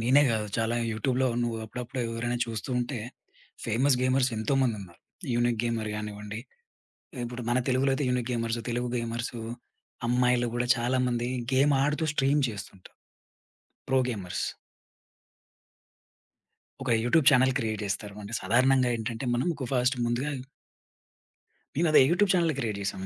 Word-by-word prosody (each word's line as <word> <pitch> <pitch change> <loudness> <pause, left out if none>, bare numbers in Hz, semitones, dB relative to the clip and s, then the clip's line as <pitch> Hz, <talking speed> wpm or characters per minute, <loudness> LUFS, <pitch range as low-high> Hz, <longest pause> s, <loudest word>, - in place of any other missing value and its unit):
నేనే 130 +5 +5
గాదు 110 -2 -1
చాలా 115 +1 0 0.2
యూట్యూబ్‌లో 130 +4 +1
నువు 120 -1 -1
అప్పుడప్పుడు 125 +3 -5
ఎవరైనా 115 +1 -2
చూస్తూ 115 +2 -5
ఉంటే 125 +1 -2 0.7
ఫేమస్ 125 +4 +3
గేమర్స్ 130 0 +3
ఎంతోమందున్నారు. 110 -6 -1 0.3
'యూనిక్ 120 -1 +1
గేమర్' 115 -2 -1
గానివ్వండి, 105 0 -6 0.8
ఇప్పుడు 120 +1 -6
మన 120 - +3
తెలుగులో 130 +2 +2
అయితే 135 0 -1
యూనిక్ 125 -1 0
గేమర్స్ 115 -1 -1
తెలుగు 120 +1 -1
గేమర్సు. 115 0 -3 0.7
అమ్మాయిలు 125 0 +3
గూడా 120 0 -1
చాలామంది 120 0 0 0.3
గేమ్ 140 +3 +4
ఆడుతూ 150 +3 +1
స్ట్రీమ్ 140 +1 +2
చేస్తుంటారు 100 -3 -10 0.9
ప్రో 135 0 +3
గేమర్స్. 100 -7 -3 2.4
ఒక 125 -3 +2
యూట్యూబ్ 135 +4 +3
చానెల్ 130 -2 +4
క్రియేట్ 110 -4 -2
జేస్తారు. 100 0 -4
అంటే 105 +2 -8
సాధారణంగా 130 +2 +3
ఏంటంటే 115 +3 -4
మనం 120 +7 0
కొ 130 - -2
ఫాస్ట్ 125 +1 +2
ముందుగాయ్ 130 +4 -1 1.4
నేను 170 +2 +3
అదే 155 - +8
యూట్యూబ్ 195 +4 +3
ఛానెల్ 170 -3 +2
క్రియేట్ 110 -6 -2
జేశాను. 100 -1 -3
120 Hz, 130 wpm, -28 LUFS, 115-130 Hz, 2.4 s, అదే